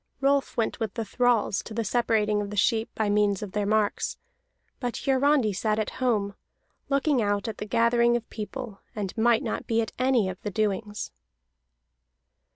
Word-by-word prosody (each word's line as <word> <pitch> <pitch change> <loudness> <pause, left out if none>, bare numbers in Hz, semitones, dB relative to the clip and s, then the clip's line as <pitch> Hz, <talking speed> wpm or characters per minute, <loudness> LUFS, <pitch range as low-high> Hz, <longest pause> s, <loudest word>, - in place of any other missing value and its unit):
Rolf 275 0 +1
went 230 +1 0
with 220 -4 -3
the 225 -2 -2
thralls 240 -2 +2
to 220 - -9
the 230 - 0
separating 215 -2 +1
of 200 - -4
the 210 - -6
sheep 220 +3 +2
by 220 - 0
means 205 -1 +2
of 200 - -6
their 205 +1 -1
marks; 215 -1 0 0.6
but 245 -2 -3
Hiarandi 270 -4 +3
sat 215 +2 0
at 215 -1 -1
home, 210 -5 +1 0.6
looking 275 -1 +2
out 205 0 0
at 220 - -5
the 210 - -5
gathering 235 +2 +3
of 230 - -8
people, 220 -1 -6
and 200 -4 -4
might 230 0 +3
not - - -3
be 225 0 +1
at 225 - -1
any 255 -5 +3
of 185 -1 -6
the 210 - -3
doings. 210 0 -2
220 Hz, 175 wpm, -26 LUFS, 205-240 Hz, 0.6 s, Hiarandi